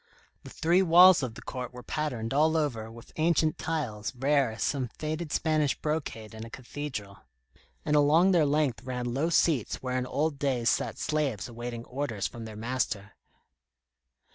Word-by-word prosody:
The - - -10
three 170 +3 +2
walls 180 0 +7
of 125 -4 -4
the - - -10
court 125 -2 -5
were 125 0 -10
patterned 125 -7 -3
all 155 +3 +3
over 120 -8 -1
with 115 0 -14
ancient 160 -1 +2
tiles 125 -10 -3
rare 135 -1 +2
as 110 - -3
some 135 -3 0
faded 155 +1 -3
Spanish 155 -3 +1
brocade 140 -8 -3
in 110 0 -8
a 115 - -8
cathedral, 125 -5 -7 0.7
and 150 - +2
along 155 +6 +5
their 165 -5 +4
length 145 -4 +1
ran 125 -1 -3
low 145 +6 0
seats 160 -7 +2
where 130 0 -1
in 125 - -3
old 145 +1 -1
days 130 -5 +1
sat - - 0
slaves 140 -8 -1
awaiting 120 0 -6
orders 125 -7 -3
from 115 -1 -5
their 110 -1 -8
master. 110 -3 -2
135 Hz, 165 wpm, -28 LUFS, 120-155 Hz, 0.7 s, walls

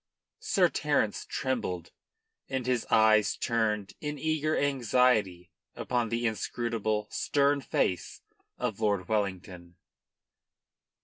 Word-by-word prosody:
Sir - - +3
Terence - - 0
trembled, 110 -10 -3 0.6
and 130 -2 -2
his 125 -2 0
eyes 110 -2 +4
turned 110 -4 -1
in 150 0 -4
eager 155 +1 0
anxiety 120 -9 +1 0.2
upon 120 -2 -1
the 120 +1 -1
inscrutable, 110 -1 -1
stern 140 0 +1
face 90 -8 -1 0.4
of 105 - -3
Lord 100 -4 0
Wellington. 95 -4 -3
110 Hz, 100 wpm, -29 LUFS, 100-130 Hz, 0.6 s, eyes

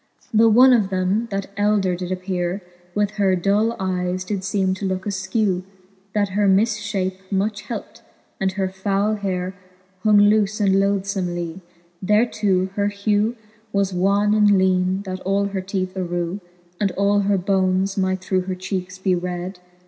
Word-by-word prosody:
XXIX. 220 - -7
The 225 0 +6
one 250 +4 +7
of 215 -5 +2
them, 190 +4 0
that 195 -1 -3
elder 205 -3 +2
did 180 0 -5
appeare, 185 0 -2 0.3
With 205 -1 +1
her 195 -2 +3
dull 205 +5 +1
eyes 185 -1 -1
did 195 +1 -3
feeme 190 0 0
to 200 - -4
looke 185 0 -3
askew, 195 -1 -1 0.5
That 205 -1 +2
her 200 +2 +1
mif 195 +4 +4
fhape 190 -3 -2
much 205 +1 -1
helpt; - - -7 0.4
and 190 0 0
her 190 -1 -1
foule 195 +2 0
heare 185 -2 -2 0.5
Hung 210 +2 +4
loofe 210 0 +4
and 200 -2 +3
loathfomcly: 190 -3 -1 0.4
Thereto 200 -2 +2
her 200 0 0
hew 205 +2 0 0.4
Was 200 -2 0
wan 200 +3 +2
and 210 -1 +4
leane, 185 +1 +1
that 185 0 -4
all 195 +2 0
her 190 - -1
teeth 185 -1 -3
arew. 175 0 -2 0.4
And 200 -2 +1
all 200 +1 +2
her 200 0 +2
bones 190 0 +1
might 190 -1 0
through 185 0 +1
her 185 - -2
cheekes 185 0 -4
be 190 0 +1
red 180 +1 -4
195 Hz, 165 wpm, -22 LUFS, 185-205 Hz, 0.5 s, one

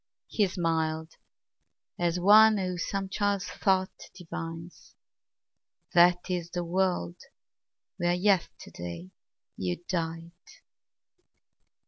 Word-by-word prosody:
He 205 -3 +1
smiled 160 -2 -2 0.8
as 175 0 0
one 215 +3 +7
who 185 -2 -2
some 195 +3 -2
child's 200 0 -1
thought 190 -1 -1
divines: 165 -1 -8 1.0
"That 175 0 +5
is 175 -2 -3
the 175 0 -3
world 175 - -1 0.8
where 175 0 +1
yesternight 95 - -2 0.5
you 90 -1 -2
died." 165 -1 -3
175 Hz, 85 wpm, -28 LUFS, 165-190 Hz, 1.0 s, one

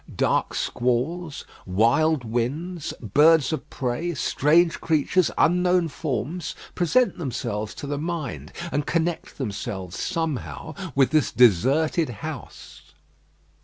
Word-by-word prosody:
Dark - - +1
squalls, 140 +7 -1 0.2
wild 120 +10 +2
winds, 140 +9 -2
birds 150 +6 +4
of 155 - -5
prey, 145 +7 -2
strange 160 +5 +2
creatures, 160 +3 +2
unknown 180 0 +3
forms, 150 - -3 0.2
present 180 +7 +2
themselves 110 -7 -3
to - - -7
the 145 0 -3
mind, 145 - -4 0.2
and 145 0 -1
connect 165 0 -1
themselves 100 -6 -5
somehow 160 -2 -3 0.2
with 135 -1 +4
this 155 -2 +2
deserted 135 - +3 0.2
house. 155 -6 -8
150 Hz, 105 wpm, -24 LUFS, 120-165 Hz, 0.2 s, birds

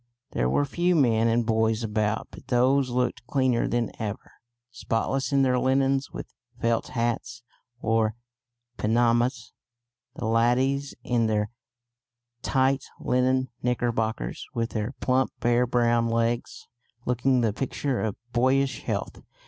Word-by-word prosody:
There - - 0
were 145 - +2
few 175 +5 +1
men 115 -6 +3
and 115 0 +2
boys 110 0 +1
about, 110 0 -1
but - - -13
those 130 +2 +3
looked 125 -1 -1
cleaner 130 -4 +1
than 120 -1 -1
ever 105 -2 -5 0.4
spotless 130 +3 -1
in 140 -1 +4
their 125 -1 +2
linens, 135 +1 +1
with - - -8 0.3
felt 115 0 0
hats 120 -1 -2 0.4
or 110 -1 +1 0.6
panamas; 120 +2 +1 0.6
the 120 - -5
laddies, 125 +5 +1
in 120 -2 +1
their 105 -1 0 0.9
tight 135 +1 +1 0.2
linen 130 +1 +1
knickerbockers 115 - -1
with 115 0 -1
their 110 +3 -3
plump 130 +1 +1
bare 120 +1 +2
brown 120 -1 +2
legs, 115 +1 -1 0.4
looking 125 +1 +2
the 110 -3 +1
picture 135 +2 -2
of 105 -3 -1 0.2
boyish 130 +3 +2
health. - - -4
120 Hz, 125 wpm, -26 LUFS, 115-130 Hz, 0.9 s, in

